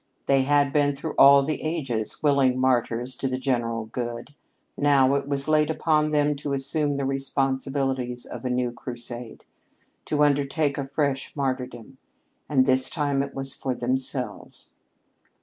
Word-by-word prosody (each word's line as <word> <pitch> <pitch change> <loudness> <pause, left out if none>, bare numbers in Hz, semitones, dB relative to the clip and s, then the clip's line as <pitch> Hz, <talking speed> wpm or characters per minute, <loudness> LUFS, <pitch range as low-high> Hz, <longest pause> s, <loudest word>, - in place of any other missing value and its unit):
They 135 -1 +3
had 145 0 +2
been, 145 -1 +2
through 155 +3 -5
all 140 0 +7
the 155 +2 -3
ages, 135 -10 -3
willing 140 -3 +3
martyrs 125 -1 0
to 135 - -2
the 130 0 -2
general 120 -4 -1
good. 120 +4 -6 0.4
Now 140 -2 +3
it 140 0 -1
was 140 0 0
laid 155 0 +3
upon 155 -1 +1
them 150 -1 +2
to 140 0 -4
assume 145 +1 0
the 140 - -2
responsibilities 135 -2 -1
of - - -8
a 130 - -2
new 125 -1 0
crusade, 120 -1 -8 0.6
to 150 -1 +1
undertake 145 0 +1
a 135 - -3
fresh 140 -1 -2
martyrdom, 130 -2 -4 0.5
and 130 -3 +3
this 130 -1 +2
time 145 -3 0
it 140 0 -5
was 135 0 -2
for 130 -2 -3
themselves. 130 +2 -2
135 Hz, 150 wpm, -25 LUFS, 130-145 Hz, 0.6 s, all